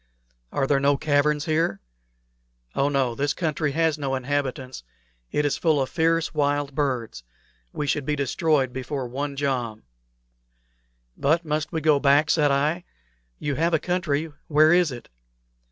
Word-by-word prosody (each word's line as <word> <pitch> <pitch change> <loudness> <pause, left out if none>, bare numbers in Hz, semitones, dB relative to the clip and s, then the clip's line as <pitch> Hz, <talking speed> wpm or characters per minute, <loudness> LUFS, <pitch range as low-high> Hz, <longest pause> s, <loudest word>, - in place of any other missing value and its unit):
"Are 135 - 0
there 140 0 +2
no 140 0 +3
caverns 145 0 +1
here?" 155 -10 0 0.9
"Oh 140 - +1
no. 135 -4 +1
This 140 +4 -1
country 155 -3 -1
has 160 -1 +1
no 135 -2 -1
inhabitants. 130 - -3 0.5
It 150 - 0
is 145 - 0
full 160 -4 +2
of 130 - -1
fierce 165 -1 +1
wild 145 -1 0
beasts. 125 - -2 0.5
We 150 - -3
should 145 0 0
be 150 +2 -1
destroyed 140 -1 +1
before 130 0 -4
one 140 +3 -4
jom." 125 -6 -2 1.3
"But 165 +4 +1
must 155 0 -2
we 160 -2 -2
go 150 -2 +4
back?" 145 +2 +4
said 150 -3 +3
I. 150 +5 +1 0.5
"You 145 - -2
have 165 +1 +2
a - - +4
country. 160 -3 -1
Where 155 +2 +5
is 175 -4 +3
it? 120 -1 -9
145 Hz, 155 wpm, -24 LUFS, 135-155 Hz, 1.3 s, Where